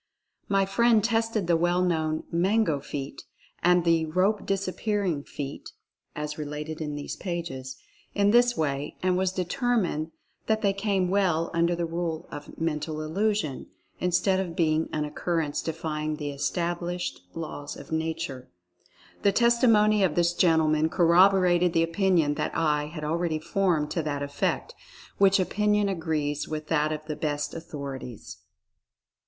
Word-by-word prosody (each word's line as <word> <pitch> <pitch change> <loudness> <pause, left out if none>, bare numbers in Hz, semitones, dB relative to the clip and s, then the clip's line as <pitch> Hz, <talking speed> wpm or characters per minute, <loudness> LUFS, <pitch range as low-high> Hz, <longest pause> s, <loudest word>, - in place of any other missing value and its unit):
My 195 -1 +3
friend 225 +2 +3
tested 225 -3 +1
the 170 0 +3
well 175 +2 +2
known 160 -3 0
"Mango 180 -2 +2
feat" 140 0 -6 0.4
and 180 0 +4
the 165 -1 +3
"Rope 185 +6 +1
disappear 200 +2 -1
ing 165 -7 -1
feat" 140 -1 -7 0.4
(as 150 0 -4
related 150 +1 -5
in 150 -1 -3
these 145 -1 -5
pages) 135 -8 -5 0.4
in 205 0 +3
this 240 +1 +4
way 145 -2 -2
and 185 -1 +2 0.2
determined 185 - 0 0.4
that 220 0 +1
they 200 -1 +3
came 195 -2 0
well 175 -5 +1
under 170 +1 +2
the 170 0 -1
rule 165 -1 -3
of 145 0 -9
"Mental 155 -1 -2
Illusion," 180 -1 -1 0.3
instead 180 +2 +2
of 175 -3 -3
being 160 -1 +1
an 150 -1 -1
occurrence 150 0 -2
defying 155 -2 -3
the 145 -2 -4
established 175 +4 -2
laws 145 -3 -6
of - - -12
Nature. 160 -5 -3 0.7
The 200 - +4
testi 235 +3 +4
mony 210 -1 +4
of 180 -5 +1
this 175 0 +2
gentleman 160 -3 +3
corroborated 180 0 +4
the 165 - +3
opinion 165 -3 +2
that - - -2
I 150 -2 +1
had 155 0 -7
already 165 +1 0
formed 160 -2 0
to 170 - 0
that 145 -2 -3
effect, 145 - -2 0.5
which 195 0 +5
opinion 210 +2 +1
agrees 155 -5 -2
with 155 0 -5
that 155 -1 +2
of 155 0 -4
the 155 -1 -4
best 145 -1 -2
authorities. 140 -7 -7
165 Hz, 145 wpm, -27 LUFS, 150-190 Hz, 0.7 s, which